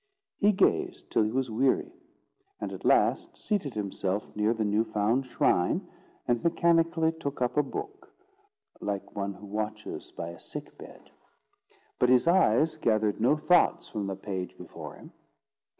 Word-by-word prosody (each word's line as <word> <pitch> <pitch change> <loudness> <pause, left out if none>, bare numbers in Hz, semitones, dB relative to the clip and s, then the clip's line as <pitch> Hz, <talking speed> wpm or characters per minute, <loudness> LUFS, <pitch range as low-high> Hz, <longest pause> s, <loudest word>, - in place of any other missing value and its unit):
He 205 0 +5
gazed 195 - +1
till - - +3
he 105 - +2
was 130 -1 -1
weary, 130 - +1 0.7
and - - -4
at - - -8
last - - +2
seated 180 - -2
himself 100 -1 -3
near 105 +1 +2
the 110 -2 0
new 105 +2 +2
found 110 +4 0
shrine, 90 -7 +1 0.4
and 120 -1 +1
mechanically 165 -1 +3
took 145 -3 -4
up 125 -1 0
a 150 - +5
book, 400 - -7 0.7
like 100 -1 -4
one 100 -1 -3
who 100 - -12
watches 105 +1 -5
by 85 - -6
a 85 - -10
sick - - -9
bed. - - -14 0.9
But 125 - +4
his 125 +4 +4
eyes 160 -4 +4
gathered 110 -2 +1
no 135 +7 +4
thoughts 175 +1 +3
from 105 -3 -3
the 95 - -3
page 95 -1 -5
before - - -9
him. - - -14
115 Hz, 155 wpm, -28 LUFS, 105-160 Hz, 0.9 s, He